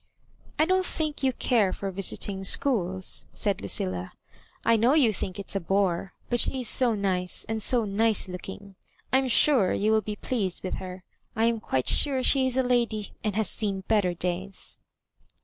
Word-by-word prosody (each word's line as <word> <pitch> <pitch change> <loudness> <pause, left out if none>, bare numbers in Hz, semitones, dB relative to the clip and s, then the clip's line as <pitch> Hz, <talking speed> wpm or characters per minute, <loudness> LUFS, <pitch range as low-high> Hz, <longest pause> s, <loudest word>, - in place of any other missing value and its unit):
" - - -29
I 310 - +4
don't 370 +2 +2
think 310 -5 -2
you 265 -1 +2
care 225 -6 +1
for 195 0 -4
visiting 195 +1 0
schools," 190 -4 +1
said 200 -3 +1
Lucilla. 95 -2 -1
♦* - - -43 0.3
I 230 - +5
know 235 +6 +3
you 250 -8 +4
think 185 -1 -4
it 200 - -7
is - - -6
a - - +1
bore; 190 0 0
but 240 - 0
she 260 +2 +2
is 245 - -6
so 240 -2 +1
nice, 185 -3 -1
and 220 0 -2
so 240 0 +2
nioe4ooking; 200 -2 -1 0.4
I 265 - +6
am 265 - -1
sure 250 -5 +4
you 215 +2 +1
will 220 0 +3
be 210 +1 -5
pleased 205 -5 -3
with 185 - -3
her. 185 0 -8 0.3
I 225 0 +2
am 230 -1 +1
quite 130 -11 -2
sure 270 -3 +1
she 265 -1 +3
is 260 0 -2
a 260 - +3
lady, 235 -4 0
and 210 -2 -1
has 220 -2 0
seen 200 -3 -3
better 200 -5 +2
days." 180 +3 -4
210 Hz, 195 wpm, -26 LUFS, 190-245 Hz, 0.4 s, I